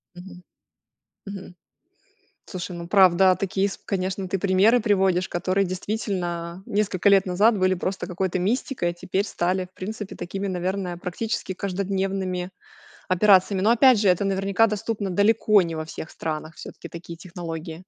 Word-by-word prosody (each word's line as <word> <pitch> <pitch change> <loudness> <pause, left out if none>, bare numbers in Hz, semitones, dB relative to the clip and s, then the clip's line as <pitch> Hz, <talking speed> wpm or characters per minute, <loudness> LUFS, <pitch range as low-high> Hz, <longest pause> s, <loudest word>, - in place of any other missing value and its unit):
Мгм. 180 0 -12 0.8
Мгм. 195 -2 -8 1.0
Слушай, 180 -1 -6
ну 170 0 -7
правда, 185 -1 +5
такие 195 0 0
с 195 - -7
конечно, 190 -1 -3
ты 195 - -1
примеры 200 +5 +4
приводишь, 190 -5 +2
которые 185 +3 0
действительно 180 -3 -4
несколько 200 -1 +1
лет 195 -1 +5
назад 205 +5 +3
были 185 0 +3
просто 185 +1 -3
какой-то 185 0 -2
мистикой, 220 0 -1
а 175 - -4
теперь 190 +3 -2
стали 185 -1 -1
в 180 - -23
принципе 205 +1 -6
такими, 195 +3 -4
наверное, 185 0 -2
практически 190 +2 -4
каждодневными 190 -1 -2 0.6
операциями, 190 0 +4
но 215 - +4
опять 245 0 +6
же, 205 - +3
это 180 +2 +3
наверняка 195 +2 +2
доступно 210 -1 -3
далеко 210 +2 +4
не 165 -1 -4
во 155 0 -4
всех 160 0 -8
странах, 155 0 -5
всё-таки - - -10
такие 170 0 -9
технологии. 165 -2 -7
190 Hz, 150 wpm, -24 LUFS, 180-200 Hz, 1.0 s, опять